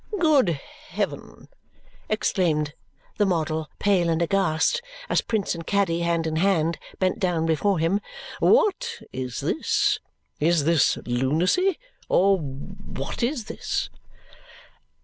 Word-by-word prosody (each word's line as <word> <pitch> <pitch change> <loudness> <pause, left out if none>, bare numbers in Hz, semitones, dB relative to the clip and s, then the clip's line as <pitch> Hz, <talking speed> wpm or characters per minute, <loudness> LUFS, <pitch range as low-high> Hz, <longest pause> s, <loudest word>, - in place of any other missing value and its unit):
"Good 270 - +3 0.3
heaven!" - - -4 0.6
exclaimed 160 -8 +1 0.5
the 205 - +4
model, 160 -3 -1
pale 185 -4 +2
and 165 -1 +1
aghast 190 - +1 0.3
as - - +3
Prince 215 -4 -1
and 165 -1 -7
Caddy, 195 -5 +1
hand 170 -1 0
in 160 0 -1
hand, 170 -2 +2 0.2
bent 185 -1 0
down 175 -4 +1
before 170 +5 +2
him. 165 +6 +1 0.4
"What 470 +2 +3 0.2
is 125 -1 -4
this? - - +1 0.4
Is 165 0 +3
this 165 -1 +3
lunacy! 160 - +1 0.3
Or 195 +1 +4
what 135 -1 -7
is 240 -1 -1
this?" - - -3
170 Hz, 115 wpm, -25 LUFS, 160-200 Hz, 0.6 s, the